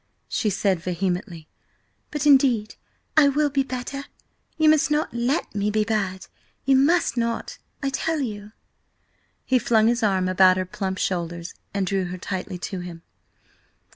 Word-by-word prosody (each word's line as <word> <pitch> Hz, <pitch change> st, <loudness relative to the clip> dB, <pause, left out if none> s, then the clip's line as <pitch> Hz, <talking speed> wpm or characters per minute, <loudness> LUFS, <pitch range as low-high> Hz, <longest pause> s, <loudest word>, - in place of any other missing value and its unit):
she 220 Hz, -, 0 dB
said 195 Hz, -2 st, +1 dB
vehemently. 175 Hz, -2 st, -3 dB, 0.6 s
"But 295 Hz, -1 st, -3 dB
indeed 260 Hz, -7 st, +4 dB, 0.4 s
I 310 Hz, -3 st, +7 dB
will 290 Hz, +1 st, +1 dB
be 275 Hz, 0 st, +2 dB
better. 270 Hz, +1 st, -5 dB, 0.5 s
You 315 Hz, -1 st, +3 dB
must 305 Hz, -2 st, +4 dB
not 300 Hz, -4 st, 0 dB
let 240 Hz, +6 st, -1 dB
me 205 Hz, 0 st, 0 dB
be 215 Hz, 0 st, +1 dB
bad–you 205 Hz, +5 st, -2 dB
must 280 Hz, -1 st, +3 dB
not, 230 Hz, 0 st, -2 dB, 0.2 s
I 275 Hz, -, 0 dB
tell 320 Hz, +3 st, -1 dB
you!" 210 Hz, -5 st, -5 dB, 0.9 s
He 255 Hz, -1 st, +3 dB
flung 225 Hz, -2 st, +3 dB
his 240 Hz, +2 st, +2 dB
arm 190 Hz, -4 st, +2 dB
about 185 Hz, 0 st, +5 dB
her 185 Hz, -, -1 dB
plump 190 Hz, +1 st, -4 dB
shoulders 170 Hz, -2 st, -3 dB, 0.2 s
and 200 Hz, -1 st, -1 dB
drew 190 Hz, 0 st, 0 dB
her 180 Hz, +1 st, -5 dB
tightly 185 Hz, 0 st, -5 dB
to 185 Hz, +1 st, -5 dB
him. 175 Hz, -2 st, -8 dB
210 Hz, 150 wpm, -24 LUFS, 185-270 Hz, 0.9 s, I